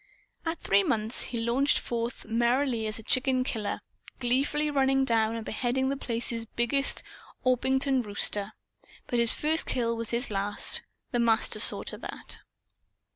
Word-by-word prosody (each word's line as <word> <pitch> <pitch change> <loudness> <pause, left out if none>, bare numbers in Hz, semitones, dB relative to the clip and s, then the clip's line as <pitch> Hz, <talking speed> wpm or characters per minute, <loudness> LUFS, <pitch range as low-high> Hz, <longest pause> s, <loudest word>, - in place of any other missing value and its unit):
At 325 +1 -1
three 200 +1 +3
months 215 +3 -1
he 240 - -5
launched 245 +5 +2
forth 235 0 -4
merrily 235 +1 +1
as 215 - -1
a 225 - -8
chicken 255 +2 +1
killer; 215 -5 -3 0.4
gleefully 275 +4 0
running 270 -1 +2
down 225 -2 +1
and 225 -1 -5
beheading 260 +3 -1
The 275 - -1
Place's 230 -3 -3
biggest 240 +5 +1 0.4
Orpington 265 +1 +2
rooster. 205 -1 0 0.5
But 240 - -1
his 235 -1 +7
first 315 +2 +3
kill 230 -2 0
was 230 -1 -1
his 235 0 -1
last. 200 +1 +1 0.3
The 240 - 0
Master 230 -1 +2
saw - - +1
to - - -4
that. - - -6
240 Hz, 150 wpm, -28 LUFS, 225-265 Hz, 0.5 s, his